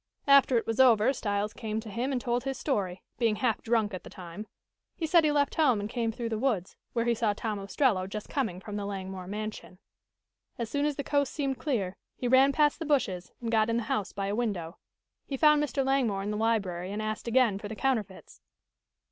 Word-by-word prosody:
After 275 Hz, -3 st, +6 dB
it 230 Hz, -, 0 dB
was 225 Hz, +1 st, -2 dB
over, 245 Hz, -1 st, +6 dB
Styles 205 Hz, -3 st, -2 dB
came 220 Hz, -2 st, -3 dB
to 220 Hz, 0 st, -8 dB
him 245 Hz, +6 st, -2 dB
and 260 Hz, -, 0 dB
told 240 Hz, 0 st, -1 dB
his 270 Hz, -1 st, -3 dB
story, 195 Hz, -11 st, -2 dB, 0.2 s
being 225 Hz, -3 st, +2 dB
half 230 Hz, -1 st, 0 dB
drunk 225 Hz, -3 st, +1 dB
at 185 Hz, -, -6 dB
the -, -, -10 dB
time. 180 Hz, +4 st, -9 dB, 0.5 s
He 330 Hz, -, -2 dB
said 330 Hz, +1 st, +5 dB
he 305 Hz, -, +3 dB
left 285 Hz, -1 st, +2 dB
home 260 Hz, -9 st, +3 dB
and 205 Hz, -, -3 dB
came 230 Hz, 0 st, -1 dB
through 230 Hz, +1 st, -4 dB
the 220 Hz, -1 st, -2 dB
woods, 220 Hz, -8 st, -1 dB, 0.2 s
where 230 Hz, -1 st, 0 dB
he 235 Hz, -, +3 dB
saw 220 Hz, -2 st, +1 dB
Tom 215 Hz, -1 st, -3 dB
Ostrello 200 Hz, -1 st, +1 dB
just 210 Hz, +2 st, -6 dB
coming 225 Hz, -11 st, -2 dB
from 205 Hz, +1 st, -6 dB
the 200 Hz, -1 st, -3 dB
Langmore 190 Hz, -2 st, -5 dB
mansion. 210 Hz, -2 st, -6 dB, 0.8 s
As 230 Hz, -2 st, -4 dB
soon 285 Hz, +1 st, +1 dB
as 295 Hz, -, -1 dB
the 280 Hz, -, -3 dB
coast 285 Hz, -2 st, +1 dB
seemed 275 Hz, -3 st, -2 dB
clear, 200 Hz, -10 st, -1 dB, 0.2 s
he 250 Hz, -, -2 dB
ran 260 Hz, +2 st, +6 dB
past 295 Hz, +2 st, +2 dB
the -, -, -3 dB
bushes 205 Hz, -12 st, 0 dB
and 230 Hz, -1 st, -3 dB
got 220 Hz, -1 st, +3 dB
in 230 Hz, -, +1 dB
the 235 Hz, -, -1 dB
house 210 Hz, -2 st, -2 dB
by 195 Hz, 0 st, -3 dB
a 200 Hz, -, -1 dB
window. 195 Hz, -8 st, -3 dB, 0.5 s
He 275 Hz, -, -3 dB
found 300 Hz, 0 st, +5 dB
Mr. 275 Hz, -2 st, -1 dB
Langmore 245 Hz, -8 st, +1 dB
in 205 Hz, -, -2 dB
the -, -, -2 dB
library 195 Hz, -5 st, 0 dB
and 205 Hz, -, -3 dB
asked 215 Hz, +2 st, -3 dB
again 235 Hz, -4 st, +3 dB
for 205 Hz, -, -6 dB
the 220 Hz, -, -6 dB
counterfeits. 220 Hz, -7 st, -2 dB
225 Hz, 225 wpm, -29 LUFS, 205-265 Hz, 0.8 s, After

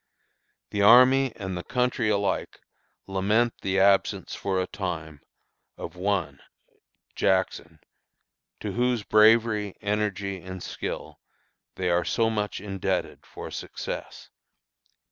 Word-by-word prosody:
The 100 Hz, -, -1 dB
army 130 Hz, +5 st, +7 dB
and 95 Hz, -2 st, -5 dB
the 90 Hz, -, -3 dB
country 125 Hz, -3 st, 0 dB
alike 100 Hz, -1 st, -1 dB, 0.5 s
lament 105 Hz, +5 st, +1 dB
the 95 Hz, 0 st, 0 dB
absence 100 Hz, 0 st, +2 dB
for 95 Hz, -1 st, -1 dB
a 95 Hz, -, 0 dB
time 80 Hz, -7 st, -5 dB, 0.6 s
of -, -, -7 dB
one 95 Hz, -1 st, -1 dB, 0.8 s
[Jackson] 90 Hz, -4 st, 0 dB, 0.8 s
to -, -, -3 dB
whose 120 Hz, -2 st, 0 dB
bravery, 110 Hz, -2 st, +4 dB
energy, 100 Hz, -2 st, -2 dB
and 95 Hz, 0 st, -8 dB
skill -, -, -6 dB, 0.6 s
they 90 Hz, -1 st, -1 dB
are 85 Hz, 0 st, +2 dB
so 115 Hz, -1 st, +1 dB
much 105 Hz, -2 st, -2 dB
indebted 95 Hz, -1 st, -3 dB
for -, -, -8 dB
success." -, -, -7 dB
100 Hz, 110 wpm, -26 LUFS, 95-110 Hz, 0.8 s, army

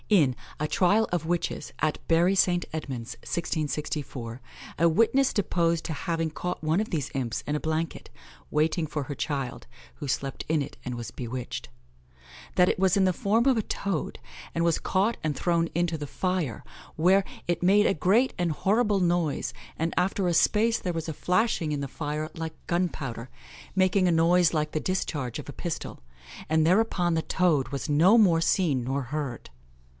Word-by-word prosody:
In 150 Hz, -, +4 dB, 0.2 s
"a 150 Hz, -, 0 dB
Tryal 200 Hz, +7 st, +3 dB
of 170 Hz, -3 st, 0 dB
Witches, 170 Hz, -3 st, -2 dB
at 155 Hz, -1 st, 0 dB
Bury 170 Hz, +3 st, +4 dB
St. 175 Hz, -2 st, +3 dB
Edmunds, 130 Hz, -7 st, -5 dB
1664," 145 Hz, -7 st, -3 dB, 0.4 s
a 170 Hz, 0 st, +5 dB
witness 230 Hz, +10 st, +3 dB
deposed 170 Hz, -5 st, 0 dB
to 160 Hz, -, -2 dB
having 165 Hz, 0 st, -2 dB
caught 180 Hz, +3 st, -4 dB
one 160 Hz, +5 st, +1 dB
of 215 Hz, -, -4 dB
these 145 Hz, -5 st, -2 dB
imps 120 Hz, -4 st, -2 dB
in 150 Hz, -, 0 dB
a 150 Hz, -, -2 dB
blanket, 160 Hz, +1 st, -3 dB, 0.4 s
waiting 160 Hz, +2 st, +1 dB
for 150 Hz, -1 st, -3 dB
her 145 Hz, +1 st, -6 dB
child, 135 Hz, -4 st, -3 dB, 0.3 s
who 145 Hz, -3 st, -6 dB
slept 135 Hz, +1 st, -2 dB
in 160 Hz, -2 st, +2 dB
it 140 Hz, -, -6 dB
and 125 Hz, -1 st, -4 dB
was 115 Hz, -5 st, -6 dB
bewitched; 125 Hz, +2 st, -5 dB, 0.9 s
that 180 Hz, -, +5 dB
it -, -, +1 dB
was 190 Hz, +1 st, +3 dB
in 195 Hz, -, +4 dB
the 185 Hz, -, +3 dB
form 220 Hz, +7 st, +1 dB
of 270 Hz, -2 st, +5 dB
a -, -, +2 dB
toad, 200 Hz, -5 st, -3 dB, 0.3 s
and 170 Hz, 0 st, +1 dB
was 170 Hz, -2 st, +2 dB
caught 200 Hz, +5 st, +1 dB
and 155 Hz, -1 st, 0 dB
thrown 170 Hz, -1 st, +1 dB
into 170 Hz, -1 st, 0 dB
the 145 Hz, -, -5 dB
fire, 180 Hz, -, -2 dB, 0.3 s
where 185 Hz, +5 st, +4 dB, 0.2 s
"it 175 Hz, 0 st, -1 dB
made 205 Hz, +3 st, +5 dB
a -, -, +3 dB
great 210 Hz, -, +3 dB
and 175 Hz, -3 st, 0 dB
horrible 205 Hz, +5 st, +2 dB
noise, 175 Hz, -4 st, 0 dB, 0.2 s
and 165 Hz, +1 st, -1 dB
after 190 Hz, 0 st, +1 dB
a 175 Hz, -, +2 dB
space 220 Hz, +6 st, +3 dB
there 180 Hz, -, -2 dB
was 165 Hz, -1 st, -4 dB
a 160 Hz, -, -3 dB
flashing 180 Hz, 0 st, +1 dB
in 145 Hz, -, -1 dB
the 140 Hz, -, -3 dB
fire 150 Hz, +2 st, -4 dB
like 160 Hz, -1 st, -5 dB
gunpowder, 140 Hz, -9 st, -2 dB, 0.5 s
making 185 Hz, 0 st, +3 dB
a -, -, +3 dB
noise 170 Hz, +1 st, +4 dB
like 150 Hz, -1 st, 0 dB
the 155 Hz, -, -1 dB
discharge 150 Hz, -9 st, -2 dB
of -, -, -8 dB
a -, -, -7 dB
pistol, -, -, -5 dB, 0.5 s
and 160 Hz, 0 st, +3 dB
thereupon 180 Hz, -2 st, +2 dB
the 160 Hz, -, +1 dB
toad 160 Hz, -6 st, +1 dB
was 140 Hz, -1 st, -4 dB
no 165 Hz, +9 st, +5 dB
more 175 Hz, -7 st, +5 dB
seen 160 Hz, -7 st, +2 dB
nor 135 Hz, +3 st, -1 dB
heard." 135 Hz, -2 st, -5 dB
165 Hz, 180 wpm, -27 LUFS, 150-185 Hz, 0.9 s, a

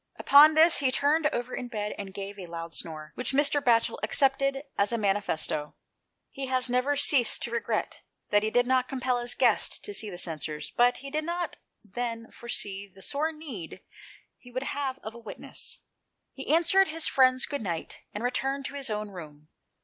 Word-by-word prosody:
Upon 300 Hz, +2 st, +7 dB
this, 325 Hz, +2 st, +7 dB
he 270 Hz, -2 st, +2 dB
turned 300 Hz, +4 st, +2 dB
over 250 Hz, -4 st, -3 dB
in 245 Hz, -, -5 dB
bed 210 Hz, -3 st, -3 dB
and 195 Hz, -1 st, -7 dB
gave 200 Hz, +1 st, -7 dB
a 180 Hz, -, -7 dB
loud 165 Hz, 0 st, -6 dB
snore, 155 Hz, -2 st, -4 dB
which 250 Hz, +2 st, -3 dB
Mr. 285 Hz, +1 st, +3 dB
Batchel 230 Hz, -3 st, +2 dB
accepted 275 Hz, +3 st, +2 dB
as 200 Hz, +2 st, +2 dB
a 235 Hz, -, 0 dB
manifesto. 195 Hz, -7 st, 0 dB, 0.6 s
He 270 Hz, -1 st, -5 dB
has 255 Hz, -1 st, +1 dB
never 255 Hz, +4 st, +2 dB
ceased 275 Hz, -4 st, +4 dB
to 235 Hz, -, -3 dB
regret 235 Hz, -, -2 dB, 0.3 s
that 205 Hz, -, +5 dB
he 215 Hz, -, 0 dB
did 245 Hz, +2 st, +3 dB
not 255 Hz, 0 st, +2 dB
compel 255 Hz, -2 st, 0 dB
his 240 Hz, 0 st, -2 dB
guest 240 Hz, -5 st, +2 dB
to 205 Hz, -, -5 dB
see 210 Hz, +1 st, -2 dB
the 180 Hz, -, -7 dB
censers, 155 Hz, -3 st, -4 dB
but 245 Hz, +1 st, +4 dB
he 275 Hz, -, -6 dB
did 310 Hz, +1 st, -1 dB
not 345 Hz, +2 st, -3 dB, 0.3 s
then 230 Hz, +2 st, -5 dB
foresee 200 Hz, -4 st, -5 dB
the 195 Hz, 0 st, -9 dB
sore 305 Hz, +3 st, 0 dB
need 275 Hz, -, -8 dB, 0.6 s
he 245 Hz, -, -15 dB
would 255 Hz, +2 st, -4 dB
have 275 Hz, -2 st, -3 dB
of 220 Hz, -, -6 dB
a 235 Hz, -, -11 dB
witness. 230 Hz, -, -7 dB, 0.6 s
He 270 Hz, -, -9 dB
answered 345 Hz, +4 st, +4 dB
his 320 Hz, +1 st, -1 dB
friend's 255 Hz, -1 st, +4 dB
good 285 Hz, -3 st, -4 dB
night, 170 Hz, -6 st, -4 dB
and 210 Hz, -, -5 dB
returned 270 Hz, +2 st, -1 dB
to 275 Hz, -, -5 dB
his 275 Hz, -3 st, -3 dB
own 210 Hz, -1 st, -3 dB
room. 155 Hz, -4 st, -11 dB
245 Hz, 190 wpm, -28 LUFS, 205-275 Hz, 0.6 s, Upon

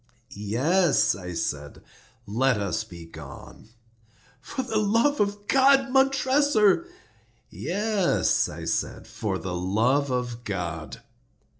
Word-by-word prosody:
"Yes," 130 Hz, -, +2 dB
I 90 Hz, -2 st, -7 dB
said, 75 Hz, -3 st, -4 dB, 0.4 s
"let 120 Hz, +4 st, +1 dB
us 100 Hz, +2 st, -2 dB
be 85 Hz, -6 st, -11 dB
gone." 80 Hz, +5 st, -12 dB, 0.7 s
"For 260 Hz, -, -4 dB
the 225 Hz, -3 st, -1 dB
love 230 Hz, +8 st, +2 dB
of 205 Hz, 0 st, -1 dB
God, 270 Hz, 0 st, +4 dB
Montressor!" 270 Hz, -, +3 dB, 0.6 s
"Yes," 205 Hz, -1 st, 0 dB
I -, -, -8 dB
said, -, -, -2 dB
"for 105 Hz, -3 st, -3 dB
the 95 Hz, -1 st, -5 dB
love 110 Hz, +11 st, +1 dB
of 125 Hz, -2 st, -3 dB
God!" 85 Hz, -6 st, -5 dB
130 Hz, 110 wpm, -25 LUFS, -, 0.7 s, God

